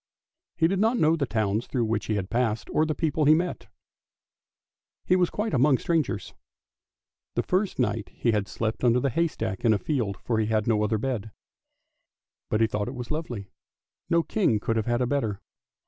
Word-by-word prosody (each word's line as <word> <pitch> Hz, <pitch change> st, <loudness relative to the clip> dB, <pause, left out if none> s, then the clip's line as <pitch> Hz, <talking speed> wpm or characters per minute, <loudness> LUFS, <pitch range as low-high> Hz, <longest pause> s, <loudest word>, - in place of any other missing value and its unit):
He 165 Hz, -, +4 dB
did 190 Hz, +2 st, 0 dB
not 225 Hz, +4 st, +3 dB
know 160 Hz, -3 st, +4 dB
the 145 Hz, -4 st, -1 dB
towns 110 Hz, 0 st, 0 dB
through 120 Hz, -3 st, 0 dB
which 110 Hz, -2 st, -1 dB
he 105 Hz, -2 st, 0 dB
passed, 115 Hz, +2 st, -1 dB
or 155 Hz, -, +2 dB
the 155 Hz, -, -1 dB
people 155 Hz, -2 st, 0 dB
he 155 Hz, +2 st, +7 dB
met, 175 Hz, +2 st, -2 dB, 1.4 s
he 180 Hz, -, +4 dB
was 180 Hz, -2 st, +3 dB
quite 210 Hz, -3 st, -2 dB
among 135 Hz, +1 st, +4 dB
strangers. 155 Hz, -11 st, -1 dB, 1.0 s
The -, -, +1 dB
first 190 Hz, +1 st, 0 dB
night 115 Hz, -4 st, -1 dB
he 115 Hz, -, 0 dB
had 105 Hz, -2 st, 0 dB
to -, -, -12 dB
sleep 110 Hz, +1 st, -2 dB
under 125 Hz, +1 st, +3 dB
a 135 Hz, -, +2 dB
haystack 115 Hz, -, -1 dB
in 115 Hz, -, +5 dB
a -, -, +2 dB
field, 110 Hz, -, -2 dB
for 115 Hz, -2 st, -1 dB
he 110 Hz, -, +1 dB
had 110 Hz, -1 st, +1 dB
no 110 Hz, -2 st, +2 dB
other 110 Hz, +1 st, +1 dB
bed. 110 Hz, -2 st, -3 dB, 1.2 s
But 110 Hz, -, +1 dB
he -, -, +6 dB
thought 105 Hz, -1 st, -2 dB
it 125 Hz, -, -5 dB
was 125 Hz, +1 st, -6 dB
lovely, 120 Hz, -, -4 dB, 0.6 s
no 170 Hz, -1 st, +3 dB
king 170 Hz, -, +1 dB
could 115 Hz, +2 st, -1 dB
have 110 Hz, 0 st, -1 dB
had 120 Hz, +1 st, +1 dB
a -, -, +3 dB
better. 120 Hz, -7 st, -1 dB
120 Hz, 195 wpm, -26 LUFS, 110-155 Hz, 1.4 s, he